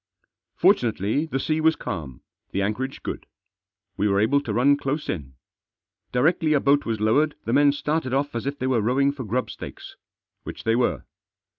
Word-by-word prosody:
Fortunately 115 - +2
the 135 - -2
sea 155 +3 0
was 160 0 +4
calm, 75 -9 -6 0.3
the 100 - -1
anchorage 125 +7 -3
good. - - -5 0.7
We 105 +1 +1
were 100 -1 +2
able 125 +7 +3
to 120 - -4
run 130 +6 +4
close 145 +1 -3
in. 70 -7 -5 0.8
Directly 155 +4 +2
a 145 - +4
boat 140 0 +2
was 115 -2 -1
lowered 145 +8 +2
the 115 - -1
men 145 +1 +5
started 150 -1 -2
off 140 +2 0
as 120 +3 -3
if 140 +1 -3
they 130 - -3
were 130 -3 +2
rowing 135 +6 +2
for 140 -2 -7
grub 125 +4 -2
stakes. - - -10 0.4
Which - - -8
they 115 0 +2
were. 120 0 0
130 Hz, 180 wpm, -24 LUFS, 110-145 Hz, 0.8 s, men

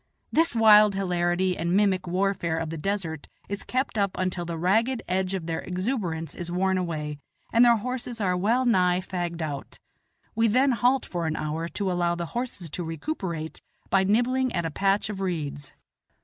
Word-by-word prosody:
This 325 -5 +2
wild 210 -2 +7
hilarity 180 -1 +1
and 170 +3 0
mimic 190 -3 +2
warfare 180 -2 0
of 160 -1 -3
the 165 - -4
desert 170 -5 -3 0.2
is 200 0 -4
kept 255 -3 -2
up 200 -2 0
until 185 -1 -2
the 170 -1 -4
ragged 225 +9 +1
edge 185 +1 0
of 180 -4 -4
their 165 -1 -2
exuberance 180 - -3
is 175 -1 -6
worn 190 +1 +1
away, 150 -4 -3 0.3
and 235 +1 +6
their 235 -1 +6
horses 245 +1 -4
are 185 -3 +1
well 225 +8 +2
nigh 180 -6 +3
fagged 175 -3 -3
out; 145 -3 -6 0.6
we 225 +1 +3
then 255 +5 +3
halt 245 +2 +2
for 170 -2 -3
an 160 - -1
hour 155 +2 -3
to 190 +2 -2
allow 175 -1 +1
the 170 0 -3
horses 240 -8 -4
to 175 - -4
recuperate 165 - -4 0.3
by 195 -1 +4
nibbling 245 +6 +2
at 170 -2 -1
a 165 - -2
patch 195 +6 +1
of 205 -2 -5
reeds. 150 -6 -3
185 Hz, 180 wpm, -26 LUFS, 170-215 Hz, 0.6 s, wild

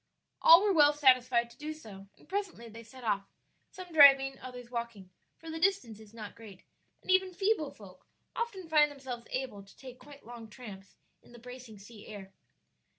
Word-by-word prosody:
All 335 +4 +8
were 410 -2 +2
well 295 -3 +5
satisfied 255 -4 +3
to - - -19
do 305 +1 -6
so, 200 -9 -13
and - - -22
presently 385 - -5
they 230 +1 -11
set 245 +3 -15
off, 200 -3 -1 0.4
some 365 -2 -11
driving, 270 -3 +6
others 250 -1 -10
walking, 235 -6 -6 0.3
for 325 -1 -10
the 325 - -6
distance 350 - 0
is 215 -2 -15
not 215 -3 -9
great, 205 -5 -14 0.4
and - - -2
even 375 -1 +2
feeble 390 -7 0
folk 190 -6 -16 0.3
often 405 -7 -4
find 305 -2 +4
themselves 260 -4 -8
able 255 -6 -5
to 195 0 -19
take 255 -2 -12
quite 285 -1 -15
long 235 -1 -11
tramps 205 -5 -12 0.3
in - - -20
the - - -12
bracing 245 -2 -12
sea 210 +1 -14
air. 195 -3 -10
250 Hz, 185 wpm, -30 LUFS, 220-305 Hz, 0.4 s, All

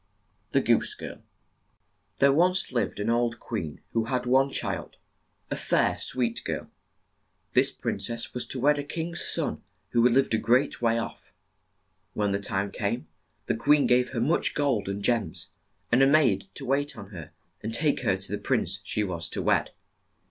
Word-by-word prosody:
THE - - +2
GOOSE - - +3
GIRL - - -8 0.9
pHERE 140 0 +4
once 180 +5 +2
lived 120 -4 -1
an 105 +3 0
old 120 0 0
queen 90 -10 -5
who 115 -1 0
had 125 +1 -1
one 135 +2 +4
child, - - -3 0.6
a - - 0
fair, - - +2
■ - - -10
sweet 120 -2 0
girl. - - -4 0.8
This - - +4
prin - - -3
cess 115 +3 -1
was 125 - -2
to 130 - -4
wed 145 +3 +3
a - - -2
king's 165 +3 -4
son - - -1 0.3
who 120 +1 +4
lived 135 0 +2
a 110 - +3
great 120 +5 +2
way 115 -1 +2
off. 115 - -6 0.8
When 105 -1 0
the 100 - 0
time 100 0 -1
came, 110 +4 -3 0.4
the - - 0
queen 145 +5 +4
gave 125 0 +3
her 125 - -3
much 150 +8 +1
gold 135 -9 0
and 100 +1 -4
gems, 110 -9 0 0.4
and 120 +3 +5
a 135 - +7
maid 155 +4 +3
to 135 - -3
wait 140 +3 0
on 100 +1 -10
her 85 -6 -8 0.3
and 110 - -4
take 145 +5 +1
her 95 - +1
to 95 +1 -8
the 105 - -2
prince 100 -7 0
she 105 - -1
was 85 -4 -3
to - - -1
wed. - - +2
120 Hz, 185 wpm, -27 LUFS, 105-135 Hz, 0.9 s, a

